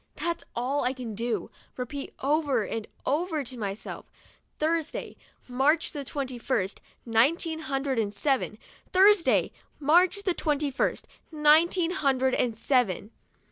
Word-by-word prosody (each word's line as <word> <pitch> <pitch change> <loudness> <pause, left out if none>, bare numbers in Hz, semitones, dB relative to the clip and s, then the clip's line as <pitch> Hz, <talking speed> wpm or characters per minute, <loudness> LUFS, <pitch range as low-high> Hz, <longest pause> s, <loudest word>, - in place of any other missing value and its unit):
That's 340 0 -2
all 260 +4 0
I 250 +1 +1
can 250 -4 -6
do, 225 -3 -2 0.3
repeat 275 +3 -5
over 280 -5 +1
and 225 +1 -4 0.2
over 315 +1 0
to 255 0 -7
myself, 205 -3 -5 0.5
"Thursday, 320 0 -1 0.3
March 275 +6 +2
the 290 -2 -5
twenty 265 -2 -4
first, 200 -6 -1 0.2
nineteen 305 +8 +2
hundred 270 -4 -1
and 205 -2 0
seven. 255 0 0 0.3
Thursday, 385 -1 +5 0.3
March 350 +7 +3
the 370 - +1
twenty 295 -3 0
first, 255 - -1 0.2
nineteen 325 +3 +4
hundred 265 -7 +1
and 235 -3 0
seven. 230 -5 +1
275 Hz, 130 wpm, -27 LUFS, 245-320 Hz, 0.5 s, Thursday